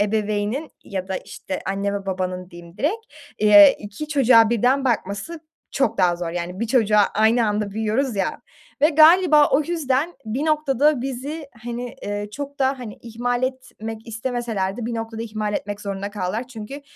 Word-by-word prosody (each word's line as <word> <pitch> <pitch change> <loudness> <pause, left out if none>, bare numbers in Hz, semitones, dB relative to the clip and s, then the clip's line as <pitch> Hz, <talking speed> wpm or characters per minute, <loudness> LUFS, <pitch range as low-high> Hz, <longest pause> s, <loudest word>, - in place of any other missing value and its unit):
ebeveynin 210 +6 -1
ya 190 -1 -5
da, 190 - -2
işte, 190 - -6
anne 200 +1 -1
ve 200 -1 -5
babanın 185 -1 -3
diyeyim 170 0 -13
direkt, 440 +10 -1 0.3
eee, 205 -1 +8
2 210 +9 -7
çocuğa 250 -6 +5
birden 250 +4 +2
bakması 235 - -2 0.3
çok 235 -5 0
daha 180 -2 +3
zor, 170 -1 -4
yani 175 +2 -5
1 230 - 0
çocuğa 215 -3 +3
aynı 220 +2 +3
anda 210 -1 -1
büyüyoruz, 220 +4 -1
ya, 195 -1 -1 0.4
ve 300 - +7
galiba 315 -1 +6
o 270 - +4
yüzden 310 0 -1
bir 250 +8 -2
noktada 300 -2 +2
bizi, 275 +4 -5 0.2
hani, 240 +1 -5
eee, 205 0 -4
çok 285 +3 -7
da, 265 0 +1
hani, 235 -4 -7
ihmal 245 +2 -2
etmek 225 -4 -5
istemeseler 225 -4 -2
de 235 -2 -4
bir 235 - -3
noktada 225 0 -4
ihmal 215 -2 -3
etmek 205 +1 -4
zorunda 200 0 -4
kaldılar. 205 +4 -3
Çünkü 250 +4 -8
225 Hz, 165 wpm, -22 LUFS, 205-270 Hz, 0.4 s, eee